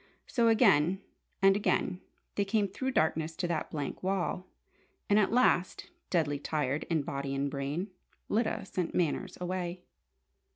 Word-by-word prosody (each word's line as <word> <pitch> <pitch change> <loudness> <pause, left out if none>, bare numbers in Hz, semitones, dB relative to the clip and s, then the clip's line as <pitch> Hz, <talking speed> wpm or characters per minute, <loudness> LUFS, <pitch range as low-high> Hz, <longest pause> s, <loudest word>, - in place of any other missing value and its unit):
So, 235 -2 +2
again 195 - +4 0.4
and 195 0 +7
again 190 -2 0 0.3
they 200 - +1
came 200 +1 +1
through 260 +7 -3
darkness 160 -7 +1
to 175 - -2
that 160 -2 -1
blank 145 -3 -4
wall! 185 -1 -1 0.6
And 205 +1 +5
at 205 - +2
last, 235 - +2 0.2
deadly 145 -5 +1
tired 145 -1 -1
in 160 -4 0
body 140 0 -3
and 140 +1 -1
brain, 145 +8 -3 0.4
Lyda 220 -2 0
sent 180 -3 -3
Manners 170 -5 0
away. 180 0 -3
180 Hz, 140 wpm, -31 LUFS, 150-195 Hz, 0.6 s, and